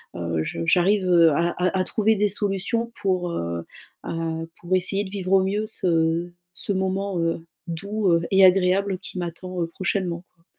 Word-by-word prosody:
heu, 85 -2 -2
je 85 - -4
j'arrive, 190 - +3
heu, 170 -2 +6
à 170 +4 +2
à 185 +1 +2
à - - +3
trouver 220 +2 +2
des 210 0 +2
solutions 205 +3 -1
pour, 185 -2 0
heu 85 - -3 0.4
heu, 165 0 -3
pour 175 +2 0
essayer 190 +2 +1
de 190 - -8
vivre 190 -2 -4
au 190 -1 +5
mieux 205 +3 -1
ce 170 -4 0 0.2
ce 200 - -2
moment, 190 0 -1
heu, 165 0 0 0.3
doux, 200 +4 -2
heu 170 0 +3
et 195 0 +6
agréable 190 +1 +3
qui 185 - -8
m'attend, 175 +1 -5
heu, - - -2
prochainement 175 0 -2
quoi. 165 - -33
185 Hz, 180 wpm, -24 LUFS, 170-195 Hz, 0.4 s, heu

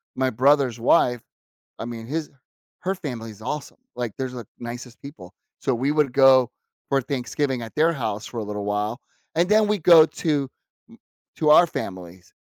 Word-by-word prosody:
my 130 0 +1
brother's 130 -1 +2
wife, 120 0 +3 0.6
I - - -5
mean, 115 -1 -7
his 155 +3 -3 0.5
her 190 +2 -1
family 125 -11 -6
is 110 +1 -14
awesome, 145 +4 -5 0.2
like, 120 -4 -3
there's 130 -1 -3
the 120 -4 -8
nicest 120 0 -8
people, 145 +3 -11 0.3
so 130 - 0
we 135 +5 0
would 150 -4 +1
go 130 -2 +5 0.4
for 135 -1 +2
Thanksgiving 135 0 -2
at 115 - -9
their 160 +2 +3
house 110 -7 -4
for 120 - -7
a 110 - -3
little 105 0 -5
while, 105 +4 -2 0.3
and 170 +3 +2
then 215 0 +4
we 210 -1 +1
go 165 -1 +8
to 145 -6 -1 0.4
m - - -18 0.4
to 155 - 0
our 175 +3 +8
family's 90 - -7
130 Hz, 180 wpm, -23 LUFS, 115-150 Hz, 0.6 s, go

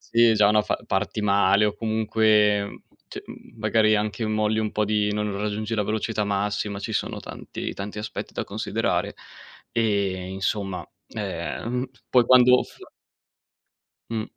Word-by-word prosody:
Sì, 115 -1 +7
già 105 -1 +5
una 105 +1 +4
fa - - -1
parti 105 +2 -1
male, 100 0 +4
o 105 - 0
comunque, 110 -1 +2
mhmm, - - -10 0.3
c - - -7
mhmm, - - -13
magari 110 -1 +3
anche 105 +2 -1
molli 110 0 +1
un 110 -1 -1
po' 105 0 0
di 105 0 +1
non 105 -1 -2
raggiungi 105 +2 -2
la 110 - +1
velocità 110 +1 -1
massima, 100 0 -1
ci 100 - -5
sono - - -2
tanti - - -7
tanti 100 +1 -6
aspetti 105 +1 -5
da - - -3
considerare. - - -2 0.6
E 100 -5 +1
insomma, 95 0 -3 0.3
ehm, 105 +6 -3 0.2
poi 125 -2 +5
quando 125 0 +6
f - - -11 1.3
Mh, 110 -1 -2
105 Hz, 150 wpm, -24 LUFS, 100-110 Hz, 1.3 s, Sì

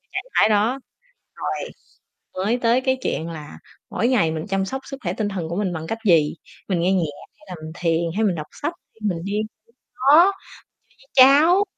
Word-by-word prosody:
trạng - - -2
thái - - +5
đó, 220 +6 +2 0.6
rồi - - -4 0.6
mới 205 +6 0
tới 240 +2 +3
cái 260 0 +1
chuyện 165 - -2
là 150 - -9 0.3
mỗi 235 - 0
ngày 205 -11 +2
mình 160 +3 -4
chăm 195 -1 0
sóc 265 +7 -4
sức 275 - -7
khỏe 175 0 -1
tinh 210 0 -2
thần 175 -5 -4
của 170 - -3
mình 190 -4 -1
bằng 160 0 -5
cách 225 0 -3
gì, 160 -5 +4 0.3
mình 185 -4 0
nghe 185 +2 +2
nhạc 180 -3 +2 0.4
hay 205 - -20
là 180 - -5
mình 160 - -7
thiền, 165 -1 0
hay 220 - +1
mình 185 -4 +1
đọc 155 -1 -6 0.2
sách, 335 - 0 0.2
hay 225 - -26
mình 180 -5 0
đi 205 +2 -2 0.6
đó, 315 +9 +6 0.8
chơi 260 -1 +9
với 275 - +7
cháu 355 +6 +4
200 Hz, 210 wpm, -22 LUFS, 170-255 Hz, 0.8 s, chơi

